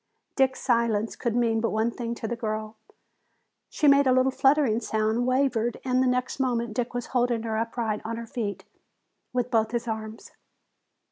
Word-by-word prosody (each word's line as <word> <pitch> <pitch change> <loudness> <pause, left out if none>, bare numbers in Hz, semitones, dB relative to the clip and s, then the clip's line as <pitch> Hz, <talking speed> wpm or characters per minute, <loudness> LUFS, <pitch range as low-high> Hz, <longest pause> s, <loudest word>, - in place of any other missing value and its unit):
Dick's 265 -1 +2
silence 230 -3 +1
could 235 -2 -2
mean 230 -2 +2
but 230 - +1
one 220 +2 0
thing 235 0 -4
to 225 - -5
the 235 - -2
girl. 215 -1 -4 0.9
She 300 - +1
made 280 -1 +6
a - - +5
little 255 +1 +3
fluttering 270 -4 +3
sound, 220 +2 0
wavered, 255 -3 +1
and 255 0 +2
the 260 - +3
next 250 +1 -1
moment 235 -4 0
Dick 240 +1 -3
was 245 - -2
holding 240 -2 +1
her 220 -1 -2
upright 225 -1 -2
on 230 +1 -4
her 235 - -6
feet 200 -5 -4 0.7
with 250 -1 -1
both 225 -2 +2
his 235 0 -3
arms. 220 0 -6
235 Hz, 180 wpm, -26 LUFS, 220-255 Hz, 0.9 s, made